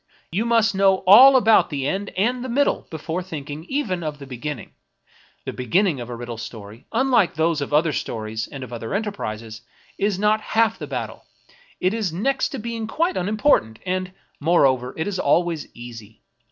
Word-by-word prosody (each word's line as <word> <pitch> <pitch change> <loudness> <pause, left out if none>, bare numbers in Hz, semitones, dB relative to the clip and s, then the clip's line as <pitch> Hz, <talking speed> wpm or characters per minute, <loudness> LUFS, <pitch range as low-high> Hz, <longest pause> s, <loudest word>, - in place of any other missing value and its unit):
You 205 +7 0
must 230 -2 +3
know 195 -1 +3
all 250 +9 +9
about 225 -4 +5
the 140 -4 -3
end 195 +5 -2
and 245 +6 +1
the 260 - -5
middle 280 +4 +1
before 160 +2 -4
thinking, 155 -3 -7
even, 210 -8 -2
of 155 -2 -4
the 140 - -10
beginning; 135 -1 -6 0.7
the - - -4
beginning 150 - +1
of 120 - -7
a 120 - -5
riddle 120 -1 -7
story, 110 0 -9
unlike 230 -7 +2
those 160 -1 +1
of 140 - -4
other 155 +1 +3
stories 110 -2 -4
and 140 -2 -8
of 120 -1 -9
other 115 +7 -4
enterprises, 115 - -4 0.4
is 200 -1 +1
not 210 +2 +2
half 225 +1 +1
the - - -6
bat - - -3
tle; - - -15 0.5
it 185 +2 +1
is 215 -6 -1
next 260 +11 0
to - - -5
being 230 0 -4
quite 340 +9 0
unimportant, 205 - +1
and, 185 0 -2 0.3
moreover, 135 -6 +2
it 160 - -1
is 195 -2 -3
always 165 +1 +1
easy. 115 -3 -11
175 Hz, 180 wpm, -22 LUFS, 130-215 Hz, 0.7 s, all